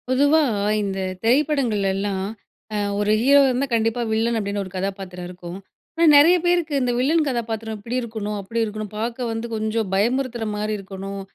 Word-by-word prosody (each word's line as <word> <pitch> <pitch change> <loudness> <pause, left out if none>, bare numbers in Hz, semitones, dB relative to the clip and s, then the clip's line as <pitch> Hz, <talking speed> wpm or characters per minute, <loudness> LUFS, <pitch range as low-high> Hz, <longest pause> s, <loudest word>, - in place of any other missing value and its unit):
பொதுவா 285 +5 +4 0.4
இந்த 195 -1 -3 0.2
திரைப்படங்கள்லலாம், 210 -8 +1 0.5
அ - - 0 0.2
ஒரு 205 0 +1
ஹீரோவா 280 +2 +6
இருந்தா 260 +3 0
கண்டிப்பா 225 +1 +1
வில்லன் 225 +1 +1
அப்டின்னு 205 -1 -2
ஒரு 185 - -11
கதாப்பாத்திரம் 185 -2 -4
இருக்கும். 180 0 -8 0.4
ஆனா 335 0 +3
நெறைய 310 +5 +7
பேருக்கு, 345 -3 +1
இந்த 250 -1 +1
வில்லன் 310 +5 +3
கதாப்பாத்திரம் 225 -3 -3
இப்டி 230 +4 -5
இருக்கணும், 215 -3 -4
அப்டி 225 +4 -2
இருக்கணும், 215 -1 -6
பார்க்க 235 +2 -3
வந்து 225 +1 -3
கொஞ்சம் 220 -1 -1
பயமுறுத்துற 240 +2 0
மாரி 210 +1 -2
இருக்கணும், 195 0 -7
225 Hz, 155 wpm, -22 LUFS, 200-255 Hz, 0.5 s, நெறைய